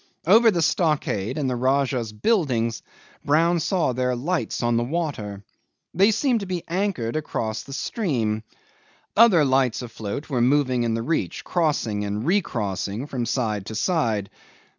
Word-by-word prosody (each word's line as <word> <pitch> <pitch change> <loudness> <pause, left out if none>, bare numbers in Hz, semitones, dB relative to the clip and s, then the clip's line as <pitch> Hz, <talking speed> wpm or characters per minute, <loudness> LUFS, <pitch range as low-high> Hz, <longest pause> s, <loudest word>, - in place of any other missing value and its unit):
Over 225 +7 +6
the 175 -6 +1
stockade 150 - 0
and 145 -3 -1
the 125 - -1
Rajah's 130 -2 0
buildings 115 - 0 0.4
Brown 165 +4 +3
saw 165 -5 0
their 125 0 0
lights 160 +2 -2
on 120 0 +2
the 120 - +2
water. 120 - -3 0.5
They 195 +5 +5
seemed 235 +2 +2
to 200 - -6
be 180 -2 -3
anchored 175 - -1
across 110 -8 -2
the 135 - -10
stream. 125 - -1 0.7
Other 200 -9 +6
lights 130 -2 +1
afloat 115 +3 -6
were 130 -5 -1
moving 130 -1 +2
in 115 -1 0
the 115 - -2
reach, 160 +6 -2
crossing 145 - 0
and 105 +3 -3
recrossing 115 - -1
from 125 -5 -3
side 105 -6 -1
to 110 - -6
side. 115 - 0
130 Hz, 150 wpm, -24 LUFS, 115-170 Hz, 0.7 s, Over